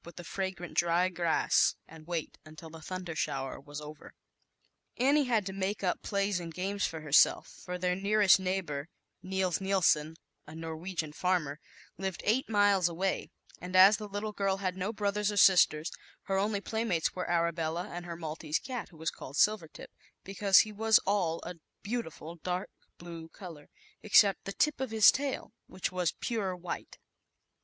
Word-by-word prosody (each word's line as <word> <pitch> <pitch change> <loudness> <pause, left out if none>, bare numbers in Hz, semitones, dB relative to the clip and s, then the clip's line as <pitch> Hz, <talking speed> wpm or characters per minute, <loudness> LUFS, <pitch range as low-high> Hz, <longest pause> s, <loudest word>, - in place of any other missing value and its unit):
with 170 - -12
the 175 - -8
fragrant 190 -1 -5
dry 175 +2 +2
grass, 170 -2 +2
and 160 0 -14
wait 170 -3 -3
until 155 +1 -12
the 165 0 -11
thunder 180 -1 -6
shower 135 -3 -3
was 145 +2 -8
over. 150 0 -11 0.8
Annie 280 +3 +3
had 225 -5 +1
to 190 - -5
make 195 +1 -3
up 180 - 0
plays 200 -2 -1
and 170 -1 -7
games 195 +4 -2
for 160 -1 -7
herself, 150 -1 +4 0.2
for 180 0 -4
their 180 0 0
nearest 200 0 +4
neigh 190 +1 -1
bor, 150 -2 -6 0.3
Nils 185 -1 -1
Nilson, 170 -5 +2 0.3
a 155 - -10
Norwegian 165 0 -5
farmer, 160 -4 -1 0.4
lived 190 -2 -4
eight 235 +4 +1
miles 205 -4 +3
away, 185 +3 -2 0.3
and 180 +1 -6
as 195 +3 +8
the 210 -1 -7
little 205 +1 -4
girl 195 -2 0
had 185 -2 -2
no 190 +3 -2
brothers 210 -1 -1
or 205 - -5
sisters, 175 -5 +5 0.3
her 195 - -2
only 205 0 0
playmates 220 -7 -1
were 180 - -4
Arabella 170 0 0
and 175 0 -7
her 170 - -5
Maltese 160 -1 -3
cat, 250 -4 -6
who 165 - -17
was 160 +1 -2
called 135 - -10
Silvertip, 210 -7 0 0.3
because 195 0 +4
he 215 - -4
was 220 +1 +4
all 185 -5 +1
a 180 - -7 0.3
beautiful 170 -7 -5
dark 180 +3 -4 0.3
blue 170 -1 -9
color, 165 -6 -11 0.3
ex 215 - +4
cept 200 -3 -2
the 195 - -4
tip 300 +2 +1
of 265 - -2
his 220 -2 +7
tail, 275 -5 -3 0.2
which 185 - -4
was 180 -2 -1
pure 205 -6 -2
white. 180 -1 -7
185 Hz, 175 wpm, -30 LUFS, 165-200 Hz, 0.8 s, as